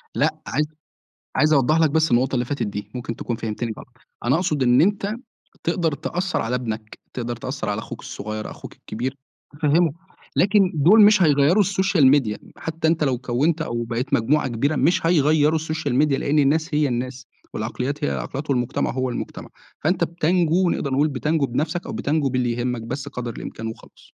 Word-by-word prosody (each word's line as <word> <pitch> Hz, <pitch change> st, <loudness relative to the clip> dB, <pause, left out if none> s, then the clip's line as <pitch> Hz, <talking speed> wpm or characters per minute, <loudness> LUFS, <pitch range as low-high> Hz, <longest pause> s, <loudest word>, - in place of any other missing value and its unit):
لأ، -, -, +2 dB
عايز 150 Hz, +3 st, 0 dB, 0.7 s
عايز 155 Hz, 0 st, +4 dB
أوضح 150 Hz, +3 st, +4 dB
لك 160 Hz, -, +4 dB
بس 160 Hz, 0 st, +2 dB
النقطة 125 Hz, +3 st, +2 dB
اللي 125 Hz, 0 st, +1 dB
فاتت 125 Hz, -4 st, -2 dB
دي، 105 Hz, +1 st, -6 dB
ممكن 120 Hz, -2 st, -5 dB
تكون 120 Hz, -, -3 dB
فهمتني 110 Hz, 0 st, -3 dB
غلط، -, -, -10 dB, 0.4 s
أنا 130 Hz, +5 st, +3 dB
أقصد 160 Hz, -6 st, 0 dB
إن 125 Hz, 0 st, +5 dB
أنت 200 Hz, +3 st, +1 dB, 0.5 s
تقدر 165 Hz, -4 st, 0 dB
تأثر 180 Hz, +6 st, -2 dB
على 115 Hz, +2 st, -2 dB
ابنك، 110 Hz, -3 st, -4 dB, 0.2 s
تقدر 120 Hz, -1 st, -3 dB
تأثر 130 Hz, +4 st, -5 dB
على 105 Hz, +1 st, -1 dB
أخوك 115 Hz, +1 st, -7 dB
الصُغيّر، 110 Hz, +1 st, -6 dB
أخوك -, -, -10 dB
الكبير 130 Hz, +4 st, -5 dB, 0.4 s
تفهمُه، 160 Hz, +1 st, +3 dB, 0.4 s
لكن 195 Hz, -1 st, +4 dB
دُول 180 Hz, +9 st, +6 dB
مش 210 Hz, -2 st, +6 dB
هيغيّروا 150 Hz, +6 st, +4 dB
الSocial 190 Hz, -5 st, +2 dB
Media 110 Hz, -7 st, 0 dB, 0.2 s
حتّى 160 Hz, 0 st, -2 dB
أنت 160 Hz, -2 st, +2 dB
لو 130 Hz, -3 st, +1 dB
كوّنت 140 Hz, +7 st, 0 dB
أو 120 Hz, -5 st, -3 dB
بقيت 125 Hz, +5 st, -2 dB
مجموعة 135 Hz, +4 st, +2 dB
كبيرة، 140 Hz, +6 st, 0 dB
مش 165 Hz, +4 st, +2 dB
هيغيّروا 155 Hz, -1 st, +3 dB
الSocial 155 Hz, -1 st, -3 dB
Media 140 Hz, +1 st, +3 dB
لإن 150 Hz, +2 st, +1 dB
الناس 155 Hz, +3 st, +2 dB
هي 150 Hz, -1 st, +3 dB
الناس، 125 Hz, +1 st, -4 dB, 0.3 s
والعقليات 125 Hz, +7 st, -3 dB
هي -, -, 0 dB
العقليات، 140 Hz, +2 st, -4 dB
والمجتمع 125 Hz, -3 st, 0 dB
هو 130 Hz, 0 st, -1 dB
المجتمع، -, -, -6 dB, 0.4 s
فأنت 170 Hz, +2 st, +2 dB
بتنجو 175 Hz, +1 st, +1 dB
نقدر 140 Hz, -2 st, -2 dB
نقول 145 Hz, +3 st, +3 dB
بتنجو 150 Hz, +2 st, 0 dB
بنفْسك 155 Hz, +8 st, -2 dB
أو -, -, -5 dB
بتنجو 145 Hz, -1 st, 0 dB
باللي 125 Hz, -2 st, 0 dB
يهمك 120 Hz, 0 st, -2 dB
بس 130 Hz, +5 st, -5 dB
قدر 125 Hz, -3 st, -5 dB
الإمكان 115 Hz, -, -7 dB
وخلاص. 110 Hz, -, -10 dB
140 Hz, 180 wpm, -22 LUFS, 120-160 Hz, 0.7 s, دُول